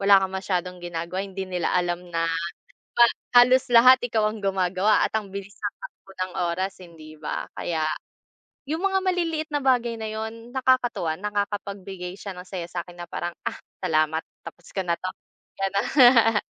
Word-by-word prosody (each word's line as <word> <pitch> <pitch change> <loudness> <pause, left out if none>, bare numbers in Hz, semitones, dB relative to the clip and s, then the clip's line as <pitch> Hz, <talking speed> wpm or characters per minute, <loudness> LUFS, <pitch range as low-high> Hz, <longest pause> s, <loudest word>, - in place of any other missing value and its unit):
wala 200 0 +7
kang 190 0 -2
masyadong 180 -1 -2
ginagawa 175 +1 -4
eh, 200 - -8
hindi 190 0 -4
nila 180 -2 -1
alam 175 0 -1
na 165 0 +1 0.5
ha 240 - +3 0.3
halos 250 +1 +6
lahat 250 +2 +8
ikaw 225 -3 +1
ang 215 -1 -8
gumagawa 190 +1 +2
at - - -11
ang 205 -3 -8
bilis 200 0 -7
ng 205 -1 -3
takbo 195 - -12 0.4
oras, 190 +3 -3
hindi 160 -3 -12
ba? 150 - -4
Kaya, 160 -2 -1 0.8
yung 315 +2 -1
mga 385 0 +2
maliliit 330 -4 0
na 295 - +1
bagay 240 -3 +2
na 220 - -4
yun, 220 +2 -6
nakakatuwa, 250 -11 +1
nakakapagbigay 200 -2 -4
siya 200 0 -7
ng 180 - -9
saya 180 -3 -5
sa 175 -1 -4
akin 175 -1 -10
na - - -7
parang, 175 0 -3
"Ah, - - -2 0.2
salamat 155 +1 +1 0.2
tapos 175 - -11
ko 195 - -2
na 170 - +2
'to." 185 - -3 0.5
Ganun. 225 +3 +4
195 Hz, 170 wpm, -25 LUFS, 180-230 Hz, 0.8 s, lahat